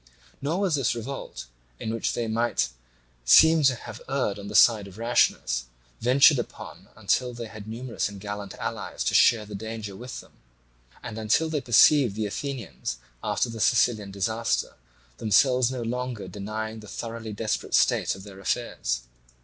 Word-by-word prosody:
Nor 160 Hz, +7 st, -1 dB
was 190 Hz, -4 st, +1 dB
this 135 Hz, -5 st, +1 dB
revolt, 130 Hz, +4 st, -6 dB, 0.3 s
in 110 Hz, -, -3 dB
which 115 Hz, -, -1 dB
they 120 Hz, -, -2 dB
might 110 Hz, -, 0 dB, 0.5 s
seem 160 Hz, -, +7 dB
to 130 Hz, -2 st, +5 dB
have -, -, -10 dB
erred 130 Hz, -7 st, -1 dB
on 100 Hz, -, -8 dB
the -, -, -6 dB
side 110 Hz, -4 st, +6 dB
of 95 Hz, 0 st, -13 dB
rashness, 110 Hz, -, +1 dB, 0.3 s
ventured 135 Hz, +4 st, +5 dB
upon 120 Hz, -, -8 dB
until 125 Hz, -1 st, 0 dB
they 120 Hz, 0 st, -6 dB
had 110 Hz, -1 st, -10 dB
numerous 115 Hz, 0 st, -3 dB
and 100 Hz, -1 st, -10 dB
gallant 105 Hz, -1 st, -6 dB
allies -, -, -4 dB
to -, -, 0 dB
share 110 Hz, -3 st, +5 dB
the 105 Hz, -, -10 dB
danger 110 Hz, -1 st, -6 dB
with 125 Hz, +5 st, -7 dB
them, -, -, -15 dB, 0.7 s
and 110 Hz, -, -6 dB
until 110 Hz, +9 st, +2 dB
they 150 Hz, -3 st, -1 dB
perceived 125 Hz, -1 st, +5 dB
the 110 Hz, 0 st, -1 dB
Athenians 120 Hz, -, -5 dB, 0.3 s
after -, -, 0 dB
the 115 Hz, -1 st, -7 dB
Sicilian 110 Hz, -3 st, +2 dB
disaster 110 Hz, +4 st, -1 dB, 0.5 s
themselves 125 Hz, +4 st, +3 dB
no 125 Hz, -2 st, -4 dB
longer 125 Hz, -1 st, -4 dB
denying 110 Hz, +2 st, -5 dB
the 105 Hz, -, -12 dB
thoroughly 115 Hz, +1 st, -6 dB
desperate 110 Hz, +1 st, -2 dB
state -, -, +3 dB
of 95 Hz, -, -11 dB
their 100 Hz, -1 st, -11 dB
affairs. -, -, -2 dB
115 Hz, 165 wpm, -26 LUFS, 105-125 Hz, 0.7 s, seem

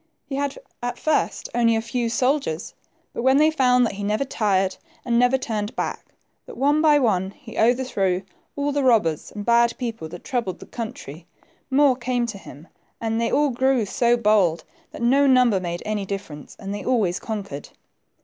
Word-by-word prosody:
He 270 Hz, -, -5 dB
had 280 Hz, 0 st, -2 dB, 0.2 s
at 245 Hz, 0 st, -3 dB
first 310 Hz, -1 st, 0 dB
only 230 Hz, -1 st, +3 dB
a -, -, +1 dB
few 235 Hz, 0 st, -2 dB
soldiers, 250 Hz, -, -1 dB, 0.4 s
but -, -, -4 dB
when 265 Hz, +2 st, +4 dB
they 310 Hz, +2 st, +5 dB
found 250 Hz, -4 st, +3 dB
that 225 Hz, -, -2 dB
he 200 Hz, +1 st, -6 dB
never 210 Hz, +6 st, 0 dB
tired 195 Hz, -6 st, 0 dB, 0.3 s
and 235 Hz, -1 st, +2 dB
never 245 Hz, +2 st, +4 dB
turned 215 Hz, -4 st, -4 dB
back; -, -, -3 dB, 0.4 s
that -, -, -10 dB
one 290 Hz, +4 st, +3 dB
by 305 Hz, -2 st, +5 dB
one 190 Hz, -8 st, +1 dB
he 225 Hz, +3 st, -13 dB
overthrew 220 Hz, -6 st, +1 dB, 0.3 s
all 285 Hz, 0 st, -1 dB
the 285 Hz, 0 st, 0 dB
robbers 215 Hz, -, +2 dB
and 205 Hz, -1 st, -7 dB
bad 235 Hz, 0 st, +3 dB
people 225 Hz, -10 st, -5 dB
that 175 Hz, +2 st, -10 dB
troubled 230 Hz, -8 st, -2 dB
the -, -, -12 dB
country, 185 Hz, -, -8 dB, 0.4 s
more 275 Hz, -1 st, +4 dB
came 245 Hz, 0 st, -1 dB
to 220 Hz, -4 st, -6 dB
him, 155 Hz, -2 st, -13 dB, 0.3 s
and 225 Hz, 0 st, -1 dB
they 230 Hz, -, 0 dB
all 290 Hz, -1 st, +2 dB
grew 260 Hz, -1 st, +1 dB
so 240 Hz, +3 st, +2 dB
bold, 205 Hz, -7 st, +2 dB, 0.3 s
that -, -, -8 dB
no 275 Hz, +4 st, +4 dB
number 250 Hz, -6 st, +4 dB
made 175 Hz, -1 st, -4 dB
any 210 Hz, -2 st, -2 dB
difference, 185 Hz, -7 st, -7 dB
and 200 Hz, -1 st, -6 dB
they 205 Hz, -, -5 dB
always 210 Hz, -8 st, +1 dB
conquered. 200 Hz, -10 st, -6 dB
235 Hz, 185 wpm, -23 LUFS, 200-260 Hz, 0.4 s, they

